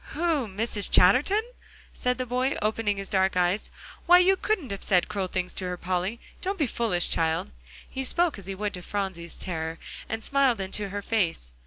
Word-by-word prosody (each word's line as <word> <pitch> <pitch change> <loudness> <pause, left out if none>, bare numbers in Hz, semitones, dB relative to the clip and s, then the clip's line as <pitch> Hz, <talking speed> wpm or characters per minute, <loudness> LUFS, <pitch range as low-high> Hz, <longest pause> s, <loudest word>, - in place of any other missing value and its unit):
"Who 315 -6 0
Mrs. 205 0 -1
Chatterton?" 280 - +5 0.5
said 250 0 -1
the 255 - -2
boy, 250 +3 0
opening 215 -1 0
his 195 0 -4
dark 190 -1 +1
eyes; 180 +3 +1 0.4
"why, 355 +1 +9
you 365 +2 +5
couldn't 370 - -2
have 200 - -5
said 180 -3 +3
cruel 195 -2 -2
things 180 0 -3
to 185 - -3
her, 180 0 -3
Polly. 185 +5 -2 0.2
Don't 390 +2 -2
be 305 - +2
foolish, 220 -8 +1
child." 160 - 0 0.4
He 265 - -4
spoke 335 -1 +2
as 190 - -10
he 195 - -4
would 210 +1 -3
to 180 - -5
Phronsie's 185 -3 -4
terror, 165 -2 -3 0.3
and 225 0 -3
smiled 275 -5 +3
into 195 +1 -2
her 200 +1 -5
face. 175 - 0
205 Hz, 190 wpm, -26 LUFS, 180-255 Hz, 0.5 s, why